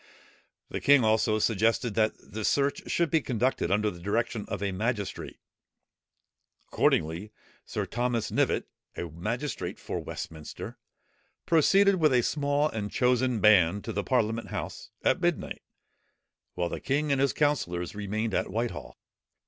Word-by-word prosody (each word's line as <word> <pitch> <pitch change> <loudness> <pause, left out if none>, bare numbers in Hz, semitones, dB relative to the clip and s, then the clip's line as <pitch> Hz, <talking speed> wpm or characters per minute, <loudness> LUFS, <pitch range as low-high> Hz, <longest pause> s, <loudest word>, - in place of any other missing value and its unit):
The - - -4
king 140 -3 +6
also 110 0 +3
suggested 115 +2 +1
that 110 0 +2
the 110 +1 -8
search 140 +5 0
should 170 -3 +1
be 160 - +3
conducted 125 -7 0
under 105 +2 +2
the 85 - -11
direction 105 +3 -1
of 100 0 -4
a 100 - 0
magistrate. 105 +1 -3 1.3
Accordingly, 85 +7 +1 0.4
Sir - - -2
Thomas 120 -2 -1
Knivett, - - +1 0.3
a 85 - -4
magistrate 115 - -4
for - - -4
Westminster, 80 -2 -7 0.7
proceeded 195 +5 +4
with 155 -5 +3
a 125 -1 +4
small 145 +1 +1
and 105 -5 -4
chosen 125 -1 +2
band, 100 -2 +5
to - - -5
the 100 - -1
parliament 115 -3 0
house, - - -6
at - - +2
midnight; - - -1 0.9
while 85 -1 -1
the - - -4
king 145 +2 0
and 135 -1 +2
his 140 - +3
councillors 90 - 0
remained 105 +1 -2
at - - 0
Whitehall. 115 +4 -4
115 Hz, 140 wpm, -28 LUFS, 100-135 Hz, 1.3 s, king